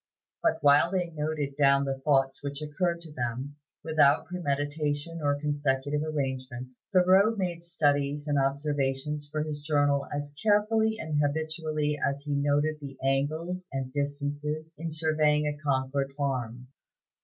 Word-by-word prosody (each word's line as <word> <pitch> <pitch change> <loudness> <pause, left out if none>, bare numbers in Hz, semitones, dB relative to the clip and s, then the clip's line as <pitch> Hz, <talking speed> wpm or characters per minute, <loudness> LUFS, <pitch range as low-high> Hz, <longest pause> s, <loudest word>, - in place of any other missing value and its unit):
But 330 - +2
while 145 +3 +6
they 180 -2 -1
noted 150 -2 -2
down 140 -1 +4
the 135 -1 -2
thoughts 135 -1 +2
which 140 0 -4
occurred 170 +3 -1
to 165 -2 -10
them, 125 +3 -4 0.3
without 155 -3 +4
premeditation 145 -1 -2
or 145 -1 +1
consecutive 145 -1 0
arrangement, 130 -4 -3 0.2
Thoreau 190 +4 +5
made 180 -4 -2
studies 145 -3 0
and 145 -1 +2
observations 140 +1 -1
for 155 -1 -1
his 150 -1 -4
journal 145 -2 +2
as 145 0 -4
carefully 220 +1 +3
and 155 -4 -1
habitually 155 0 -1
as 140 0 0
he 145 -1 -2
noted 145 +2 +1
the 135 -2 -8
angles 155 +7 -1
and 130 -1 -4
distances 145 +2 -3
in 165 +2 -4
surveying 155 -1 +2
a 150 0 -1
Concord 135 -1 0
farm. 125 -3 -3
145 Hz, 140 wpm, -28 LUFS, 140-155 Hz, 0.3 s, while